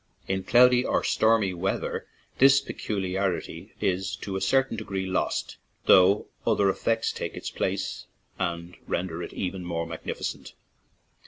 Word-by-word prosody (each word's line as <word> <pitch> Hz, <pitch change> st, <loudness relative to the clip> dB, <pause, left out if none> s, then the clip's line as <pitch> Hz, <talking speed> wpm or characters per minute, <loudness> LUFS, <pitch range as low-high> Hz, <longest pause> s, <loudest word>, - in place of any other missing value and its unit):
In 95 Hz, 0 st, -1 dB
cloudy 125 Hz, +3 st, +5 dB
or -, -, 0 dB
stormy 110 Hz, -4 st, +3 dB
weather 90 Hz, +2 st, -2 dB, 0.3 s
this 135 Hz, +1 st, +7 dB
peculiarity 95 Hz, -7 st, -3 dB
is 95 Hz, 0 st, -1 dB
to 95 Hz, -, -6 dB
a 95 Hz, -, -2 dB
certain 135 Hz, +5 st, +2 dB
degree 100 Hz, -3 st, -3 dB
lost, 95 Hz, 0 st, -2 dB, 0.3 s
though 95 Hz, +3 st, +6 dB, 0.2 s
other 100 Hz, -1 st, +3 dB
effects 115 Hz, +3 st, 0 dB
take -, -, -5 dB
its -, -, -5 dB
place -, -, -3 dB, 0.3 s
and 85 Hz, -1 st, -3 dB
render 85 Hz, -1 st, -2 dB
it -, -, -6 dB
even 95 Hz, 0 st, -4 dB
more 85 Hz, -1 st, -2 dB
magnificent. 80 Hz, -1 st, -5 dB
95 Hz, 135 wpm, -26 LUFS, 90-110 Hz, 0.3 s, this